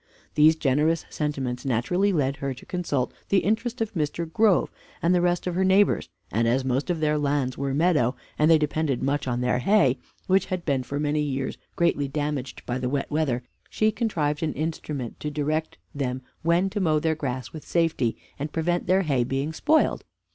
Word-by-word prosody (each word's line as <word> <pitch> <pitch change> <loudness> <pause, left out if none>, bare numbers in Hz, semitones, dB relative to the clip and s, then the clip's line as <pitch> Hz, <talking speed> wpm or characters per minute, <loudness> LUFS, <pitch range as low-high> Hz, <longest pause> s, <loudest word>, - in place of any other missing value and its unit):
These 155 +1 +6
generous 155 +2 +1
sentiments 135 -5 -2
naturally 135 - +1
led 140 -5 0
her 135 -1 -3
to 125 - -13
consult 145 -8 -2 0.2
the 195 - +4
interest 230 +4 -1
of 225 0 -1
Mr. 165 0 -1
Grove, 200 +3 +3 0.3
and 170 +2 +2
the 180 - +3
rest 175 0 +1
of 180 - -1
her 185 +2 +1
neighbors; 190 +2 +3 0.2
and 115 +3 +1
as 130 +3 +1
most 130 +5 0
of 170 -3 -1
their 150 -1 +2
lands 140 -3 0
were 135 -1 -2
meadow, 150 -6 +2 0.2
and 155 +1 +4
they 165 - +7
depended 150 -3 -1
much 140 +1 0
on 120 -1 -1
their 125 0 +1
hay, 135 -5 +3 0.3
which 190 0 +2
had 185 -2 -3
been 140 -4 +1
for 140 +3 -4
many 150 0 +1
years 135 -2 -2 0.2
greatly 170 -5 +1
damaged 145 -2 -3
by 125 +1 -2
the 125 -1 -1
wet 140 +2 -2
weather, 140 -5 0 0.3
she 215 0 +2
contrived 160 -10 -1
an 155 -2 -1
instrument 150 -5 -4
to 150 - -3
direct 155 +2 -2 0.2
them 130 -3 -3 0.2
when 170 +3 +2
to 210 - -2
mow 160 -5 +2
their 160 +1 +1
grass 130 -5 -4
with 155 - -8
safety, 165 -9 0 0.2
and 145 +2 -3
prevent 175 +2 -1
their 190 +2 +4
hay 135 -7 +1
being 135 +5 -2
spoiled. 310 - +2
150 Hz, 195 wpm, -25 LUFS, 135-170 Hz, 0.3 s, they